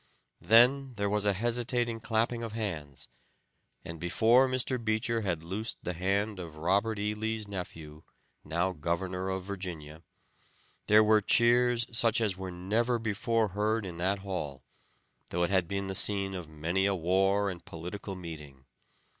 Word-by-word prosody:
Then 125 +3 +5
there 100 -1 -1
was 105 -1 0
a 100 - +3
hesitating 120 +2 -1
clapping 115 +1 0
of 115 -2 -5
hands, 80 -11 -5 0.8
and 85 -1 -7
before 110 +10 +4
Mr. 130 -1 0
Beecher 110 +1 0
had 90 -6 -2
loosed 100 +7 -4
the 90 - -2
hand 100 +3 -1
of 85 -3 -8
Robert 100 +7 +1
E. 105 +1 -1
Lee's 110 0 -3
nephew, 80 -6 -7 0.4
now 85 +4 0
Governor 90 +3 -2
of 95 -1 -3
Virginia 85 -6 -7 0.9
there 105 +1 +7
were 110 0 +4
cheers 120 +2 +4
such 115 0 +3
as 105 -5 0
were 95 0 -6
never 110 +7 0
before 115 0 0
heard 105 +2 0
in 85 -3 -7
that 95 +3 0
hall, 75 -8 -4 0.7
though 85 0 0
it 85 - 0
had 95 -3 +2
been 100 +2 -2
the 95 - -4
scene 100 0 +1
of 90 -4 -6
many 85 +5 0
a 100 - +1
war 95 +3 +2
and 85 -2 -10
political 95 +4 -7
meeting. 75 -7 -9
100 Hz, 155 wpm, -30 LUFS, 90-110 Hz, 0.9 s, there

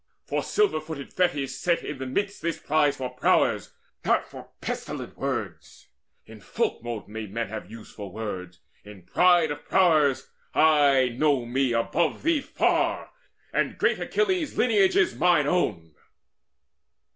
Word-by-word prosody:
For - - -1
silver 420 - +1
footed 155 -3 -8
Thetis 145 -8 0
set 170 -1 +1
in 150 -3 -6
the 130 - -4
midst 200 +9 -2
This 170 -1 -2
prize 145 -1 +1
for 130 -1 -4
prowess, 125 - +1 0.3
not - - +2
for - - -12
pestilent - - -5
words. - - -5 0.4
In 110 -1 -13
folkmote 115 +1 -3
may 110 +1 -6
men 115 +3 -4
have 110 -3 -6
some 95 - -18
use 115 -1 -11
for 100 -3 -8
words: 90 -5 -6 0.2
In 105 -3 -13
pride 175 - +3
of 145 - -6
prowess 155 -7 +2 0.2
I 145 -5 +4
know 130 0 +1
me 130 +1 0
above 155 +8 0
thee 325 -2 +2
far, - - 0 0.4
And - - 0
great - - +1
Achilles' 375 -7 -1
lineage 205 -6 +3
is 195 - +3
mine 170 -5 +3
own." 95 - -1
140 Hz, 145 wpm, -26 LUFS, 115-175 Hz, 0.4 s, I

